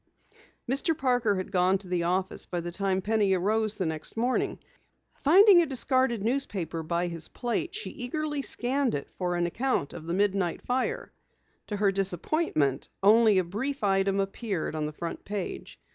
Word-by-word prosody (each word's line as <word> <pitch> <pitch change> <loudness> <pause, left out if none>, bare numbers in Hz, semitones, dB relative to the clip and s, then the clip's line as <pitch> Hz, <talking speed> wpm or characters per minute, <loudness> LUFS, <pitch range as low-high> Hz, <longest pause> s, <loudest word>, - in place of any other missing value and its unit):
Mr. 295 +6 0
Parker 245 -7 +1
had 185 -1 -4
gone 185 0 +3
to 190 -1 -12
the 180 -1 0
office 185 +2 -1
by 175 - -3
the 175 0 -5
time 190 0 -1
Penny 210 -2 +2
arose 215 +3 0
the 195 -4 -2
next 160 +5 -3
morning. 245 +3 0 0.6
Finding 370 +4 +6
a 335 - 0
discarded 260 -4 +1
newspaper 210 -9 -2
by 170 +2 -1
his 170 -2 -3
plate, 255 - -3
she 435 - -4
eagerly 295 +3 -3
scanned 265 0 0
it 140 - -6
for 180 -1 -1
an 175 0 +1
account 225 - -1
of 160 - -9
the 170 - -1
midnight 195 -3 0
fire. 255 +1 -2 0.6
To 210 - -3
her 200 -1 +3
disappointment, 185 - 0 0.2
only 215 0 +6
a 185 - +3
brief 225 +10 -4
item 195 0 +2
appeared 195 -3 -2
on 155 -1 -2
the - - -5
front 170 +2 -6
page. 200 -2 -6
200 Hz, 170 wpm, -28 LUFS, 180-250 Hz, 0.6 s, Finding